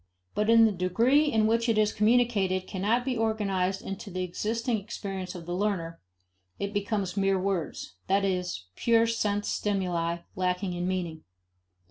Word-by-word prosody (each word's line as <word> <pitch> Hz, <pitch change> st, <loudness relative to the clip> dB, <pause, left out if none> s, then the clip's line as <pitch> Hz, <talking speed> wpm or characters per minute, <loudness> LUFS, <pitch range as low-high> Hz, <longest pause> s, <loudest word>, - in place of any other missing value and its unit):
But 210 Hz, +1 st, 0 dB
in 230 Hz, 0 st, +7 dB
the 220 Hz, -, +3 dB
degree 225 Hz, +11 st, +3 dB
in 220 Hz, -2 st, +3 dB
which 230 Hz, +2 st, +2 dB
what 225 Hz, -2 st, +2 dB
is 215 Hz, -1 st, +3 dB
communicated 210 Hz, -5 st, +2 dB
cannot 210 Hz, +7 st, 0 dB
be 260 Hz, -2 st, 0 dB
organized 195 Hz, -4 st, 0 dB
into 195 Hz, +2 st, -6 dB
the 185 Hz, 0 st, -3 dB
existing 225 Hz, +6 st, -1 dB
experience 195 Hz, -2 st, -6 dB
of 170 Hz, -2 st, -8 dB
the 175 Hz, -, -4 dB
learner, 180 Hz, -4 st, -1 dB, 0.6 s
it 200 Hz, +1 st, -3 dB
becomes 200 Hz, -2 st, -1 dB
mere 195 Hz, -1 st, +2 dB
words: 180 Hz, -, -3 dB
that 195 Hz, +1 st, +2 dB
is, 180 Hz, -, -2 dB
pure 230 Hz, -1 st, +3 dB
sense 210 Hz, -3 st, 0 dB
stimuli, 175 Hz, -4 st, -1 dB
lacking 180 Hz, 0 st, -1 dB
in 175 Hz, 0 st, -2 dB
meaning. 175 Hz, -4 st, -3 dB
195 Hz, 155 wpm, -28 LUFS, 180-220 Hz, 0.6 s, in